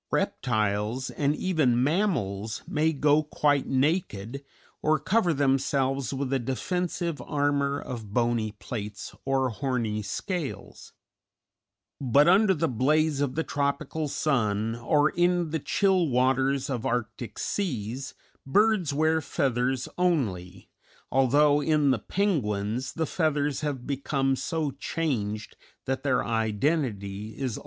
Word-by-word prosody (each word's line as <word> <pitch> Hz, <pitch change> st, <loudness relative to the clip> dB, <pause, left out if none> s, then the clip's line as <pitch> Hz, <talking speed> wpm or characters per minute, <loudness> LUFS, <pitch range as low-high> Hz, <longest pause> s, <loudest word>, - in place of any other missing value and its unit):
Reptiles, 110 Hz, +2 st, -1 dB
and 145 Hz, 0 st, 0 dB
even 150 Hz, -10 st, +2 dB
mammals, 120 Hz, -, -1 dB
may 155 Hz, +2 st, +1 dB
go 150 Hz, 0 st, +3 dB
quite 145 Hz, -2 st, +1 dB
naked 135 Hz, -, -1 dB, 0.4 s
or 155 Hz, 0 st, +3 dB
cover 185 Hz, +3 st, +2 dB
themselves 135 Hz, -2 st, +1 dB
with 135 Hz, -1 st, -2 dB
a 135 Hz, -, +2 dB
defensive 170 Hz, -, -2 dB
armor 145 Hz, -1 st, 0 dB
of 115 Hz, -6 st, -7 dB
bony 115 Hz, -2 st, 0 dB
plates 105 Hz, -1 st, -6 dB
or 135 Hz, -1 st, +1 dB
horny 115 Hz, -3 st, -2 dB
scales; 160 Hz, -, -5 dB, 1.1 s
but 140 Hz, +3 st, +4 dB
under 190 Hz, +2 st, +5 dB
the 165 Hz, +1 st, 0 dB
blaze 145 Hz, +4 st, +2 dB
of 140 Hz, -3 st, -1 dB
the 160 Hz, -, 0 dB
tropical 145 Hz, +2 st, -2 dB
sun 115 Hz, -7 st, 0 dB
or 145 Hz, +6 st, +2 dB
in 175 Hz, -2 st, +1 dB
the 160 Hz, -, -1 dB
chill 190 Hz, +2 st, +2 dB
waters 130 Hz, +1 st, +2 dB
of 125 Hz, -5 st, -3 dB
arctic 115 Hz, -2 st, -3 dB
seas 135 Hz, -, -3 dB, 0.3 s
birds 200 Hz, +2 st, +3 dB
wear 155 Hz, +2 st, +2 dB
feathers 130 Hz, -4 st, 0 dB
only, 100 Hz, -, -1 dB, 0.4 s
although 145 Hz, +3 st, +4 dB
in 150 Hz, -2 st, +3 dB
the 130 Hz, -, +1 dB
penguins 125 Hz, -, -1 dB
the 165 Hz, -, -1 dB
feathers 150 Hz, -3 st, 0 dB
have 140 Hz, -5 st, -3 dB
become 135 Hz, -1 st, 0 dB
so 155 Hz, +1 st, -2 dB
changed 120 Hz, -7 st, -3 dB, 0.3 s
that 135 Hz, 0 st, -1 dB
their 135 Hz, -2 st, +1 dB
identity 110 Hz, -3 st, -1 dB
is 130 Hz, -5 st, -2 dB
almost -, -, -6 dB
lost. -, -, -6 dB
135 Hz, 125 wpm, -27 LUFS, 120-155 Hz, 1.1 s, under